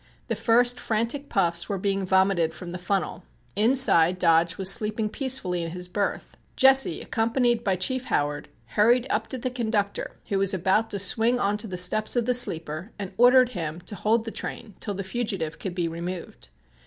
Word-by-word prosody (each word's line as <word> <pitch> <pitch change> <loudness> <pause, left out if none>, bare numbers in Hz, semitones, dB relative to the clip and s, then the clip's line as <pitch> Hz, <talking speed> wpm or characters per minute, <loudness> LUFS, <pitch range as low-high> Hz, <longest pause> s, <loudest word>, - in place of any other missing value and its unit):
The 230 - 0
first 240 +3 +2
frantic 235 +6 -2
puffs 170 -3 -1
were 200 - -2
being 195 0 -2
vomited 190 -3 +2
from 175 -1 -8
the 180 - -6
funnel. 180 -1 -2 0.3
Inside 205 -7 +4
Dodge 165 -1 +2
was 190 -1 +5
sleeping 215 +1 0
peacefully 215 -9 -1
in 165 - -4
his 180 +1 -6
berth. 200 +3 -3 0.2
Jesse, 265 0 +4
accompanied 235 +1 0
by 195 -4 +1
Chief 255 +8 -2
Howard, 145 0 -2 0.2
hurried 235 - +3
up 220 +1 -1
to 260 - -4
the 255 +1 -4
conductor 220 -5 -3
who 195 - 0
was 195 0 +2
about 190 +5 +1
to 200 - -4
swing 225 +5 +2
on 200 -2 0
to 215 - -5
the 185 -2 -6
steps 215 +6 +1
of 240 -2 +1
the 250 - +1
sleeper, 165 -6 +1
and 195 -2 -7
ordered 250 +2 +5
him 165 -7 -5
to 180 - -9
hold 220 +3 0
the 225 - -5
train 220 -1 -6
till 205 -2 -4
the 195 - -4
fugitive 190 -6 -4
could 185 -3 -5
be 175 -2 -1
removed. 170 - -7
200 Hz, 190 wpm, -25 LUFS, 180-230 Hz, 0.3 s, was